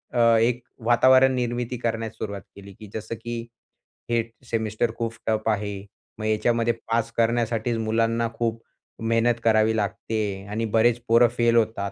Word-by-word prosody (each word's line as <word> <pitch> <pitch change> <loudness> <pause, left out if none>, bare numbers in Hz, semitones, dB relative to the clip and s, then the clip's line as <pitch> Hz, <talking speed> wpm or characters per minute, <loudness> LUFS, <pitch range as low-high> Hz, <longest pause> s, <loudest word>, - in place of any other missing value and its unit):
अ, - - +2 0.2
एक 120 +2 +2 0.2
वातावरण 130 +2 +5
निर्मिती 120 0 -2
करण्यास 115 -1 -2
सुरुवात 100 -2 -5
केली 100 0 -12
की 110 - -10
जसं, 110 +1 -5
की 115 +1 -6 0.6
हे 120 0 +2 0.2
सेमिस्टर 110 -1 -1
खूप 115 -1 -2
टफ 110 0 0
आहे. 105 -1 -1 0.5
मग 110 - -4
याच्यामध्ये 115 +2 +1 0.2
पास 115 0 +1
करण्यासाठीचं 115 0 +1
मुलांना 115 +1 +1
खूप 115 -1 -2 0.4
मेहनत 115 +1 +2
करावी 110 0 +3
लागते 105 +1 -3
आहे 100 -1 -4
आणि 110 +2 -2
बरेचं 115 +1 +4
पोरं 115 +1 +6
फेल 120 0 +3
होतात. 110 -3 +1
115 Hz, 150 wpm, -24 LUFS, 110-120 Hz, 0.6 s, पोरं